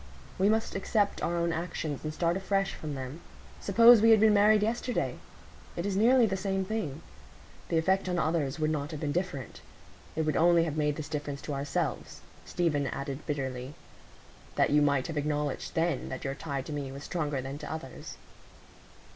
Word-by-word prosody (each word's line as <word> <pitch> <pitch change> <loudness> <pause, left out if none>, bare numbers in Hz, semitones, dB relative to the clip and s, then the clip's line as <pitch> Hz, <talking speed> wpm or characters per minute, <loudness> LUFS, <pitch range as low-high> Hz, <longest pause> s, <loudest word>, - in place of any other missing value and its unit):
We 195 +2 +4
must 220 +1 +1
accept 205 +1 0
our 170 +1 0
own 170 0 0
actions 160 -3 -4
and 155 - -3
start 170 +2 0
afresh 195 0 0
from 150 -2 -6
them. 135 +5 -6 0.4
Suppose 230 +3 +7
we 225 - +6
had 220 -1 +7
been 215 0 +5
married 210 +1 +5
yesterday? 240 +3 -1 0.6
It 170 - -3
is 200 -1 -1
nearly 240 +4 +5
the 190 -3 -1
same 190 0 -1
thing. 180 -8 -4 0.7
The 165 - +1
effect 190 +3 +1
on 180 - 0
others 155 -4 0
would 155 -1 0
not 145 -2 -2
have 155 -2 -6
been 145 -1 -2
different. 145 - -4 0.5
It 160 - 0
would 155 0 0
only 170 0 +5
have 160 -3 -2
made 150 -1 +1
this 155 -1 -6
difference 145 -2 -4
to 150 - -4
ourselves," 140 0 -3 0.3
Stephen 150 -5 0
added 140 +1 -5
bitterly, 135 -1 -3 0.8
"that - - +3
you 150 0 +5
might 140 -3 +2
have 160 - -4
acknowledged 150 -1 -2
then 165 -4 0
that 130 - -6
your 135 - -2
tie 140 -2 -4
to 150 - -7
me 140 -2 -4
was 140 +1 -8
stronger 150 -5 -2
than 135 +2 -6
to - - -7
others." 155 -5 -7
160 Hz, 190 wpm, -29 LUFS, 145-190 Hz, 0.8 s, Suppose